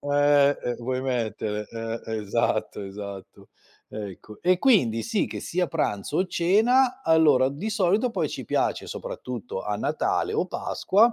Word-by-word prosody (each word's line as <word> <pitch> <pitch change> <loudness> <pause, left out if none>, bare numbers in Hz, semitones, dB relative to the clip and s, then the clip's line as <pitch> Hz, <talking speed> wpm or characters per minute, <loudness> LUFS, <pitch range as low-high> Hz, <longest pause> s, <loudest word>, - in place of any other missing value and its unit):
Eh, 145 0 +4
eh, 120 - -1
vuoi 130 +2 -2
mettere? 110 -4 -2
Eh, 115 0 -5
esatto, 105 0 -1
esatto. 100 -1 -9 0.4
Ecco. 105 0 -8
E 180 +1 +3
quindi 130 - +3
sì, 225 -3 0
che - - -6
sia 180 0 -1
pranzo 105 - -1
o 185 - +2
cena, 245 +10 +3
allora 150 -5 +5
di 165 +11 -4
solito 210 +4 +2
poi - - -1
ci - - -6
piace, - - 0
soprattutto - - -6
a - - -2
Natale 425 - 0
o 440 0 0
Pasqua, 225 +5 +2
145 Hz, 145 wpm, -25 LUFS, -, 0.4 s, allora